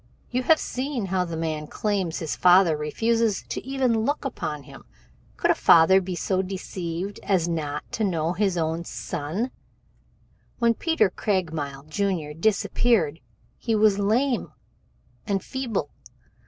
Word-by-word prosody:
You 250 +1 0
have 315 +5 +4
seen 255 -3 -3
how 185 -1 0
the 165 -2 -5
man 155 -2 -2
he - - -16
claims 195 -6 -1
is - - -3
his 160 - -2
father 180 -2 +5
refuses 225 +8 0
to - - -5
even 260 -3 +1
look 285 +4 -1
upon 150 - -4
him. - - -13 0.5
Could - - +3
a - - +5
father 180 +4 +6
be 185 -1 -4
so 185 +2 0
deceived 185 0 -5
as 185 -4 +1
not 150 -3 -2
to 225 - -2
know 170 -4 0
his 190 -1 0
own 165 +1 -1
son? 170 - -4 1.1
When 235 -1 +3
Peter 230 - +1
Craigmile, 160 -10 -2
Jr., 160 -1 -2
disappeared 195 -2 +1 0.4
he 225 -2 0
was 210 -2 +4
lame 235 +3 +1 0.8
and 195 -2 0
feeble. 235 - -3
190 Hz, 145 wpm, -25 LUFS, 165-225 Hz, 1.1 s, father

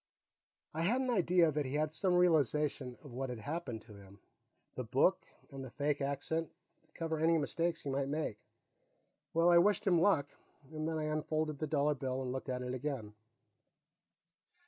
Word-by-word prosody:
I 160 - -2
had 220 +10 +2
an 255 -1 0
idea 180 -6 +4
that 150 -2 -1
he 130 - -3
had 155 0 +1
some 180 +2 +1
realization 150 -6 +2
of 145 - -11
what 130 +1 -3
had 125 - -4
happened 125 -2 -4
to 110 - -14
him 100 0 -14 0.5
the 125 - -4
book, 135 - +2 0.2
and 135 -1 -7
the 130 - -7
fake 145 +3 -1
accent, 145 +4 -1 0.4
to - - -35
cover 160 -1 -2
any 165 +1 +4
mistakes 165 +3 -1
he 140 - -3
might 135 0 0
make. 145 -8 -2 1.0
Well, 170 +1 +5
I 170 - +8
wished 205 +4 +3
him 175 -4 +4
luck, 160 -8 +3 0.4
and 155 0 -3
then 160 - -2
I 155 - -2
unfolded 155 -1 -1
the 155 - -1
dollar 150 0 +2
bill 130 -2 -3
and 125 - -3
looked 130 +1 -5
at 125 0 -2
it 125 0 -3
again. 130 -5 -4
150 Hz, 185 wpm, -34 LUFS, 130-165 Hz, 1.0 s, I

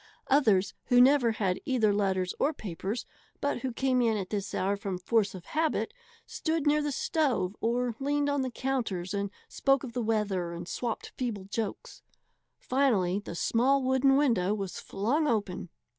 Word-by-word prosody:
Others 210 -9 +4
who 245 -1 +4
never 250 -2 +5
had 195 -3 0
either 225 -6 +2
letters 190 -3 0
or 300 - +2
papers, 200 +2 -4 0.3
but 285 -3 -1
who 260 +1 -3
came 255 +1 +1
in 225 -2 +2
at 190 -2 -5
this 200 -2 -3
hour 195 +2 +1
from 195 -2 -4
force 200 +2 +1
of 180 -1 -10
habit, 320 +8 -1 0.3
stood 320 -2 -2
near 300 +1 +3
the 295 0 -1
stove 260 - 0
or 240 +1 0
leaned 285 +1 0
on 285 -1 +1
the 260 - -1
counters 230 -9 -2
and 200 0 -1 0.2
spoke 275 0 +1
of 245 -3 -6
the 245 - -1
weather 205 -6 0
and 170 0 -7
swapped 235 +2 -4
feeble 230 -6 -3
jokes. 205 +2 -5 0.6
Finally 215 -9 +1
the 205 -4 -8
small 260 +9 +2
wooden 265 +1 +4
window 215 -9 +2
was 195 -4 -5
flung 260 +11 0
open. 200 -7 -1
230 Hz, 170 wpm, -29 LUFS, 195-270 Hz, 0.6 s, never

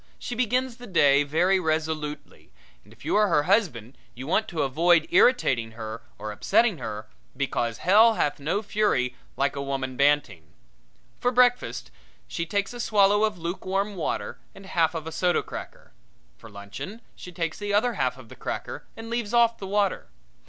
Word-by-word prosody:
She - - -6
begins 250 +1 0
the 245 0 -11
day 145 -7 +4
very 170 +7 +2
resolutely, 155 -2 -3 0.3
and - - -21
if - - -16
you - - 0
are 210 0 +4
her 150 -5 +2
husband 150 - 0 0.2
you 130 +2 -7
want 190 +8 +1
to 165 -5 -2
avoid 165 +4 +3
irritating 135 - +3
her 110 0 -7 0.2
or 105 0 -5
upsetting 210 - +2
her, 110 -2 -6 0.3
because 120 -4 -1
hell 220 +5 +6
hath 145 - 0
no 165 +9 -1
fury 205 -12 0 0.2
like 140 +1 0
a 140 - -3
woman 135 -2 -3
banting. 140 - +1 0.7
For 245 - +2
breakfast 245 - +2 0.4
she 170 - -4
takes 200 +3 -1
a 240 - -8
swallow 205 -2 +3
of 215 -3 -3
lukewarm 190 +4 -2
water 170 - -3 0.2
and 195 - -13
half 170 -3 +1
of 160 -1 -4
a 160 - -5
soda 175 +1 +1
cracker. - - -9 0.4
For 110 - -14
luncheon 100 - -8
she 180 - -10
takes 165 -2 -3
the 205 0 -3
other 230 +4 +2
half 130 - -1
of 130 -3 -13
the - - -11
cracker - - -6
and 225 0 -8
leaves 235 -1 -2
off 235 -1 +4
the 195 - -6
water. 200 0 0
170 Hz, 175 wpm, -25 LUFS, 140-210 Hz, 0.7 s, hell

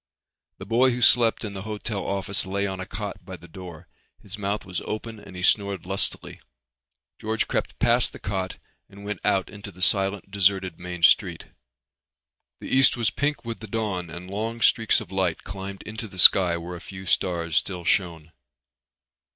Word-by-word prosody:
The 95 - -9
boy 120 +5 +3
who 125 0 -3
slept 115 -1 +4
in 100 - -6
the 95 - -6
hotel 105 -1 -5
office 100 0 -2
lay 100 +1 -1
on 95 -1 -4
a 95 - -6
cot 100 -2 -6
by 95 0 -9
the 85 +1 -15
door. 85 -1 -11 0.3
His 100 +1 -10
mouth 105 0 -3
was 90 -2 -5
open 110 0 -6
and 95 - -13
he 90 - -7
snored 100 -2 +1
lustily. 95 +1 -3 0.8
George 110 +1 -2
crept - - -3
past 120 +1 +3
the - - -10
cot 95 -2 -4 0.3
and 100 +1 -13
went 105 -3 -4
out 95 -1 +1
into 100 0 -10
the 90 - -18
silent 95 0 +3
deserted 95 -3 +1
main 90 -1 -7
street. - - +3 1.1
The - - -2
east 130 -1 +5
was 115 -3 0
pink 145 -4 -2
with 115 -1 -5
the 110 - -9
dawn 100 -5 -3
and 85 +3 -9
long 110 +4 -4
streaks 115 -1 +3
of - - -11
light 95 -3 -1
climbed 95 0 -8
into 110 +1 -7
the 95 - -14
sky 90 -1 +9
where 85 +1 -7
a 85 - -10
few 95 +1 -10
stars 85 -3 -1
still 90 -3 -2
shone. 85 -4 -1
95 Hz, 185 wpm, -24 LUFS, 90-105 Hz, 1.1 s, sky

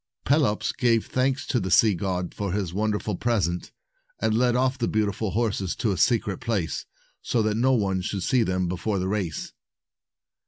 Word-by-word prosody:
Pelops 135 -7 +2
gave 115 -3 +2
thanks 130 +2 0
to 125 - 0
the 95 -3 -3
sea 105 +3 +5
god 90 -1 -3
for 100 -3 -3
his 95 -4 -2
wonderful 105 0 -1
present, 90 -6 -1 0.5
and 110 - +1
led 120 +1 +3
off 130 +1 +1
the 115 - +1
beautiful 105 0 0
horses 100 -4 -1
to 115 -4 0
a - - 0
secret 105 -1 +1
place, 110 -9 -2 0.3
so 115 -3 0
that 110 0 +1
no 125 +5 +2
one 100 -5 +1
should 95 +1 -3
see 125 +4 +2
them 90 -4 0
before 95 +4 -2
the 95 0 -1
race. 95 -6 -3
105 Hz, 175 wpm, -25 LUFS, 95-120 Hz, 0.5 s, sea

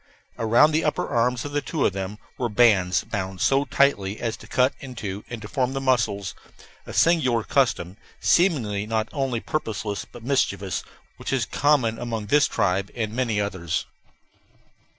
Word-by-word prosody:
Around 120 +7 +5
the 155 +1 +1
upper 150 - 0
arms 120 0 +1
of 145 0 -2
two 155 -5 0
of - - +2
them 95 +2 -4 0.2
were 120 - -2
bands 100 -6 +4
bound 95 -3 -4
so 135 +7 +3
tightly 110 -7 +1
as 115 -2 -2
to - - -14
cut 130 +1 +2
into 105 -7 -6
and 120 - -5
deform 125 +5 -2
the 135 - -2
muscles 115 -7 0 0.5
a - - -6
singular 130 -9 +3
custom, 110 - 0 0.2
seemingly 115 - +2
not 110 0 -1
only 135 -5 -1
purposeless 110 -7 -3
but 120 - -11
mischievous, 100 -8 0 0.3
which - - -5
is 130 -4 +1
common 130 -6 +2
among 115 -3 -3
this 145 +8 +4
tribe 100 -2 0
and 110 -3 -2
many 115 -4 0
others. 95 -5 -2
115 Hz, 155 wpm, -24 LUFS, 100-135 Hz, 0.5 s, Around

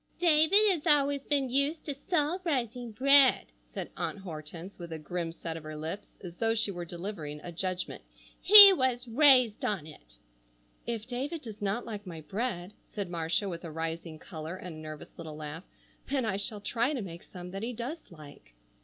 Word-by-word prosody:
"David 345 +5 +5
has 335 -3 -2
always 285 -2 +3
been 275 -3 +1
used 280 +4 0
to 290 - -3
salt 315 +4 -1
rising 245 -7 -2
bread," 275 +3 +4 0.2
said - - -6
Aunt - - -4
Hortense 170 0 -9
with 170 -1 -8
a 160 - -4
grim 165 +2 -4
set 165 0 -6
of 165 - -7
her 155 0 -8
lips 165 +7 -6
as 175 -2 -7
though 225 0 +1
she 220 -2 0
were 175 -2 -6
delivering 170 -4 -6
a 175 - -7
judgment. 185 +1 -3 0.4
"He 405 0 +12
was 255 -5 0
raised 255 -3 +4
on 195 -8 -1
it." - - -15 0.7
"If 230 -2 -3
David 275 +6 -4
does 215 -4 -9
not 205 +4 -2
like 210 -3 -7
my 165 -3 -8
bread," 195 0 -4 0.2
said 200 -4 -5
Marcia 165 +4 -1
with 170 -2 -6
a 170 - -6
rising 165 0 -5
color 160 +1 -8
and 180 -3 -8
a - - -10
nervous 155 -1 -10
little 160 -2 -7
laugh, 155 +3 -8 0.4
"then 270 -3 0
I 205 -3 -1
shall 205 +1 -3
try 240 +7 0
to 255 - -3
make 170 -2 -9
some 180 -1 -10
that 195 +1 -6
he 235 +3 -3
does 250 +8 -5
like." 145 - -15
205 Hz, 190 wpm, -29 LUFS, 165-260 Hz, 0.7 s, He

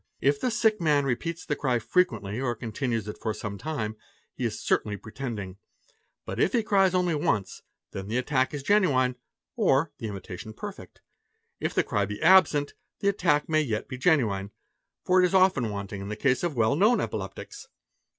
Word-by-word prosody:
It 140 +1 +1
the - - +1
sick 220 -3 +2
man 150 -3 +3
repeats 165 +7 -3
the 145 - -1
ery 125 -3 +2
frequently 115 - 0
or 120 -3 -1
continues 115 -1 -3
it 105 - -7
for 110 -1 -2
some 105 -2 -6
time, 115 -9 -3 0.4
he - - -3
is" - - -2
certainly 105 -1 0
pretending; 110 -5 -6 0.7
but - - -5
if - - +2
he 235 -3 +2
cries 195 -3 +3
out - - +5
only 180 -2 +1
once, 115 -10 -1 0.3
then 95 0 -6
the 115 +4 -1
attack 130 0 +1
is 145 -2 -5
genuine 135 -11 +3 0.4
or 165 - +2
the 115 - -4
imitation 100 +1 -7
perfect; - - -9 0.6
if - - -2
the - - +2
ery 100 -1 +2
be 105 +1 -6
absent, 160 -5 +5 0.3
the 200 - +3
attack 150 -7 +1
may 155 -1 +2
yet 115 -8 -2
be 130 - -6
genuine, 115 - +2 0.6
for 185 0 +4
it - - +5
is 195 - -2
often 185 - +4
wanting 100 -1 -5
in 100 - -6
the 105 - -3
case 130 +3 +1
of 175 -4 -2
well 110 +3 +3
known 215 +9 +4
epileptics. - - -5
135 Hz, 190 wpm, -27 LUFS, 110-175 Hz, 0.7 s, out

